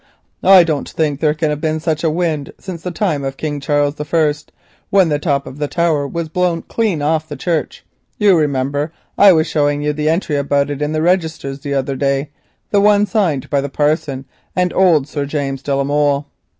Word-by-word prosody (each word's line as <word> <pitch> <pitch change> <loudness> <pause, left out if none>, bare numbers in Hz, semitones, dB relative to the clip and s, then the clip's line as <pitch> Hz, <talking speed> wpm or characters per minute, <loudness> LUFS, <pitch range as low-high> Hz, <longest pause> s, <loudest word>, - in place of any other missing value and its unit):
I 190 -2 +7
don't 155 -4 -2
think 150 -3 -1
there 150 -1 +1
can 155 -1 0
have 150 0 -3
been 160 0 -1
such 160 0 -2
a 165 - +3
wind 155 -3 -2
since 180 -4 -7
the 180 - -4
time 170 -5 -1
of 135 0 -4
King 150 -2 -3
Charles 145 0 0
I., 150 0 +1 0.6
when 190 -4 +4
the 145 -1 0
top 140 -3 0
of 135 - -10
the 145 - -1
tower 160 -3 0
was 170 +3 -4
blown 175 +1 -1
right 210 -9 +1
off 155 +1 0
the 145 - -5
church. 160 +2 -3 0.3
You 205 -3 +4
remember 145 0 0 0.2
I 200 -1 +7
was 160 -3 +3
showing 145 -2 0
you 150 0 0
the 150 +1 -1
entry 160 -3 0
about 140 0 0
it 145 0 -5
in 150 +1 -1
the 155 0 0
registers 160 -6 0
the 140 0 -3
other 135 0 -1
day, 140 +1 -1 0.4
the 200 - +3
one 205 0 +4
signed 180 - 0
by 140 -1 +2
the 140 - -4
parson 145 -2 -1 0.3
and 180 -1 +1
old 165 -7 +3
Sir 145 -2 -3
James 140 -2 -3
de 140 0 -1
la 140 - +1
Molle. 145 0 +1
150 Hz, 210 wpm, -17 LUFS, 145-170 Hz, 0.6 s, I